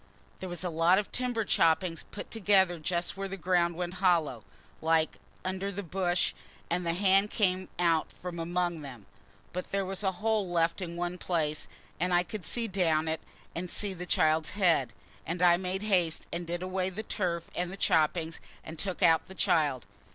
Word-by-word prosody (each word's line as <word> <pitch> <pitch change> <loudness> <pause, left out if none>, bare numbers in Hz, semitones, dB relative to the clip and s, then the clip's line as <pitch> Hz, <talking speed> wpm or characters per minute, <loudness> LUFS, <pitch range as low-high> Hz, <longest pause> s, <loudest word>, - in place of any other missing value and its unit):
"There 185 - -5
was 175 0 -4
a 180 - -1
lot 165 +3 +4
of 205 - -1
timber 245 -3 -1
choppings 165 -1 +2
put - - -8
together 190 -5 +3
just 170 +2 -1
where 195 0 -3
the 195 0 -6
ground 175 -1 +2
went 175 +1 -3
hollow, 165 - +2 0.4
like, 160 0 +2 0.3
under 190 +1 -2
the 200 +1 -5
bush, 180 0 0 0.4
and 180 +1 +1
the 170 -1 0
hand 195 +2 +4
came 185 -3 +1
out 170 -2 +2
from 175 -1 -7
among 175 0 -1
them. 125 -8 -9 0.5
But 180 +1 -3
there 195 -1 -1
was 190 +1 -4
a 190 -1 +1
hole 215 -1 0
left 170 +1 +1
in 170 -2 -5
one 175 +1 -2
place 155 -4 -1 0.3
and 180 +1 +2
I 175 - +4
could 195 -2 -7
see 235 -1 -1
down 165 -5 +1
it 160 0 -1 0.3
and 180 +1 -4
see 205 +1 -1
the 180 0 -7
child's 155 -1 +2
head; 170 - +3 0.3
and 170 +2 -3
I 175 -1 +6
made 190 +2 -3
haste 180 -6 +1
and 170 0 -3
did 175 +1 -2
away 185 0 -1
the 200 +4 -5
turf 175 -5 -2
and 180 0 -2
the 195 - -7
choppings, 160 -1 +1 0.2
and 160 0 -9
took 190 -2 -2
out 165 -1 +5
the 190 - -11
child. 155 - +2
180 Hz, 190 wpm, -30 LUFS, 165-190 Hz, 0.5 s, I